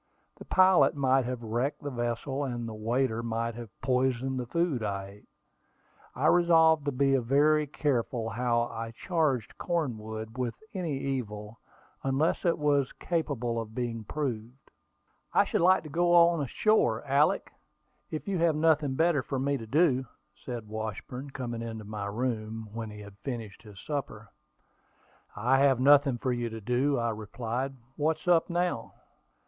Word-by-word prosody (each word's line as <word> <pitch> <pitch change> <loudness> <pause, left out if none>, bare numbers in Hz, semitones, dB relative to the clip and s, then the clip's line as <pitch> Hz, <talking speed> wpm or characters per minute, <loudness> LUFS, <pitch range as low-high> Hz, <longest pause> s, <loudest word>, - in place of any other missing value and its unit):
The - - -11
pilot 185 -8 +5
might 135 -2 +2
have 125 -1 -4
wrecked 120 +7 -2
the 145 - -3
vessel, 120 +3 -2
and 120 -3 -3
the 110 - -6
waiter 115 +2 0
might 115 0 -2
have 115 -1 -8
poisoned 130 0 0
the 125 - -4
food 170 -3 0
I 100 -2 -2
ate. 100 +1 -15 0.9
I - - -1
resolved 160 -3 +5
to 145 - +1
be 135 +1 +2
very 145 +5 +3
careful 125 -5 -1
how 120 0 +1
I 115 -1 -6
charged 155 - -1
Cornwood 110 -8 -3
with 120 -2 -1 0.2
any 170 -8 -2
evil, 110 -6 -4 0.4
unless 135 +7 0
it 170 - +3
was 145 -3 +2
capable 125 -9 -2
of 110 0 -10
being 120 -3 -3
proved. 125 -1 -5 0.6
"I - - +6
should - - 0
like 185 +1 +5
to 155 - -9
go 175 +3 +3
on 170 -2 +5
shore, 120 - +2
Alick, 140 +2 +2 0.6
if 155 +3 -5
you 195 -3 -1
have 165 -2 +3
nothing 155 -3 +2
better 160 -1 +3
for 135 - -4
me 140 +2 0
to 115 -4 -6
do," 135 -2 +2 0.3
said 120 -4 -7
Washburn, 110 +5 -5
coming 120 -3 -5
into 110 -2 -6
my 105 -1 -5
room 110 -1 -3
when 115 -1 -5
he 105 0 -9
had 100 -1 -13
finished 115 -6 -6
his 105 -3 -13
supper. 145 +1 -5 1.1
"I 125 +6 +2
have 135 -2 +4
nothing 140 -1 +5
for 125 +1 -1
you 120 -1 -2
to 115 0 -7
do," 125 +6 +1
I 115 -1 0
replied. 115 +5 -4 0.2
"What's 155 +2 -1
up 175 -1 +4
now?" 175 -9 -1
130 Hz, 160 wpm, -29 LUFS, 115-145 Hz, 1.1 s, I